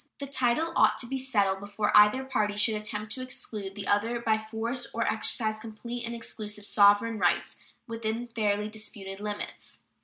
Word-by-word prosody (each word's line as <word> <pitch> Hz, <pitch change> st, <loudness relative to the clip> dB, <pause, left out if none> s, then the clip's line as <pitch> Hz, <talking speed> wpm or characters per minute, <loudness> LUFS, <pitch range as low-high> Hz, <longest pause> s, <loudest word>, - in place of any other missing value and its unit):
The 280 Hz, -, -5 dB
title 275 Hz, +4 st, +1 dB
ought -, -, +5 dB
to -, -, -1 dB
be 265 Hz, +2 st, -2 dB
settled 205 Hz, -7 st, +1 dB
before 205 Hz, +1 st, -1 dB
either 210 Hz, +5 st, +7 dB
party 215 Hz, -6 st, 0 dB
should 220 Hz, +2 st, +4 dB
attempt 210 Hz, 0 st, -4 dB
to 255 Hz, -, -3 dB
exclude 210 Hz, -6 st, -4 dB
the 205 Hz, -2 st, -5 dB
other 225 Hz, +5 st, +1 dB
by 220 Hz, -2 st, +1 dB
force 230 Hz, +3 st, -3 dB
or 230 Hz, -, +1 dB
exercise 220 Hz, 0 st, -1 dB
complete 235 Hz, +2 st, -6 dB
and 235 Hz, -, -4 dB
exclusive 210 Hz, -3 st, -5 dB
sovereign 205 Hz, +2 st, +4 dB
rights 175 Hz, -2 st, +1 dB, 0.3 s
within 230 Hz, -1 st, -3 dB
the 240 Hz, -, -20 dB
fairly 210 Hz, -2 st, +1 dB
disputed 205 Hz, -3 st, -6 dB
limits." 205 Hz, 0 st, -6 dB
220 Hz, 175 wpm, -28 LUFS, 205-235 Hz, 0.3 s, either